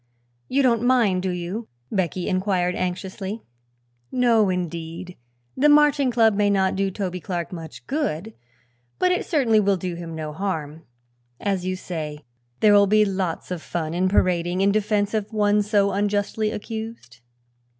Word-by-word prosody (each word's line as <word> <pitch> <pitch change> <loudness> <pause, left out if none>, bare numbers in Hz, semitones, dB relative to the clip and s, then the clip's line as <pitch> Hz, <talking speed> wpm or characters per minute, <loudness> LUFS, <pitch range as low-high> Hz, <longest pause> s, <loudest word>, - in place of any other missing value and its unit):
"You 275 +2 +2
don't 235 -3 +3
mind, 235 -7 +3
do 190 - -1
you?" 180 +6 -4 0.2
Becky 185 -2 -1
inquired 185 -1 +1
anxiously. 190 +4 -4 0.7
"No, 235 -5 +3
indeed. 175 0 -4 0.4
The 295 +3 +4
Marching 295 -2 +5
Club 225 -2 +4
may 205 0 +2
not 190 -2 +2
do 195 0 0
Toby 185 -2 -4
Clark 175 -2 -4
much 165 -3 -9
good, 225 - -2 0.6
but 365 - +2
it 360 - -1
certainly 245 -9 +3
will 200 -2 +2
do 180 0 -4
him 170 -1 -7
no 155 -1 -5
harm. 160 -4 -4 0.5
As 195 -3 -1
you 185 - -1
say, 155 -5 -6 0.4
there 210 -1 +6
will 200 0 +6
be 215 +1 +4
lots 185 -3 -3
of 180 -3 -3
fun 160 -1 -3
in 185 +2 +1
parading 180 -1 +1
in 200 +1 +4
defense 210 0 0
of 215 0 -2
one 210 -1 +3
so 205 -1 +2
unjustly 205 +2 0
accused." 220 - -7
195 Hz, 155 wpm, -23 LUFS, 180-215 Hz, 0.7 s, there